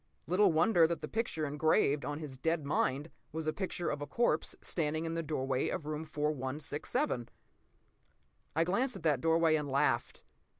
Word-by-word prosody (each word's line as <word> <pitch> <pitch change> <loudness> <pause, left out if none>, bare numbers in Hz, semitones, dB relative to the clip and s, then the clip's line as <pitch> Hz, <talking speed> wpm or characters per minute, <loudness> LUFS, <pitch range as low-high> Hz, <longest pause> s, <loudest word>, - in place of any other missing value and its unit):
Little 185 +3 +4
wonder 165 +1 +5
that 170 0 -3
the - - -4
picture 210 -8 -2
engraved 145 -1 +2
on 145 - -3
his 150 -4 -7
dead 160 0 0
mind 140 +1 0 0.2
was 160 0 -3
a 155 - 0
picture 185 -3 -2
of 145 - -4
a 145 - -4
corpse 235 -10 +1
standing 155 -1 -1
in 165 - -2
the 165 - -1
doorway 135 -4 -1
of 145 - -3
room 155 +1 -3
4167! 150 - -2 1.3
I 165 - +4
glanced 240 +9 0
at - - -9
that 150 -5 +2
doorway 165 0 +4
and 150 -2 -2
laughed. 130 -3 +1
155 Hz, 170 wpm, -33 LUFS, 145-165 Hz, 1.3 s, wonder